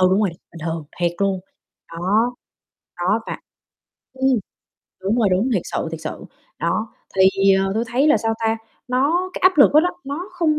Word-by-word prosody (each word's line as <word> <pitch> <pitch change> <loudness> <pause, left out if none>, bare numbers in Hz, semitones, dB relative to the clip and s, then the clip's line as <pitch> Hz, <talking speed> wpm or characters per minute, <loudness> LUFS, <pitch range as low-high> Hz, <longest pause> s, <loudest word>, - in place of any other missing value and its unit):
ừ, 185 - +6
đúng 190 +2 +3
rồi, 210 - +2
bình 170 0 -15
thường, 165 -1 -3 0.2
thiệt 170 -1 +2
luôn. 195 -2 +1 0.5
Đó, 205 +8 +1 0.7
đó - - +2
và - - -4 0.7
ừm, 265 0 +1 0.7
đúng 205 +5 +1
rồi, 220 -4 +4
đúng, 195 +8 +2
thiệt 185 - +1
sự, - - -3
thiệt 165 -1 -6
sự. 155 - -6 0.4
Đó, 215 +7 0 0.3
thì, 195 +1 +5
ờ, 195 0 +1
tôi 225 +2 0
thấy 255 +5 +2
là, 305 - +6
sao 225 0 0
ta, 225 0 +1 0.3
nó 305 +9 +1
cái - - -5
áp 370 -3 +5
lực 280 - +7
đó 305 - +8
đó, 355 +2 +1
nó 295 +7 -5
không 330 -4 +1
220 Hz, 195 wpm, -21 LUFS, 190-275 Hz, 0.7 s, đó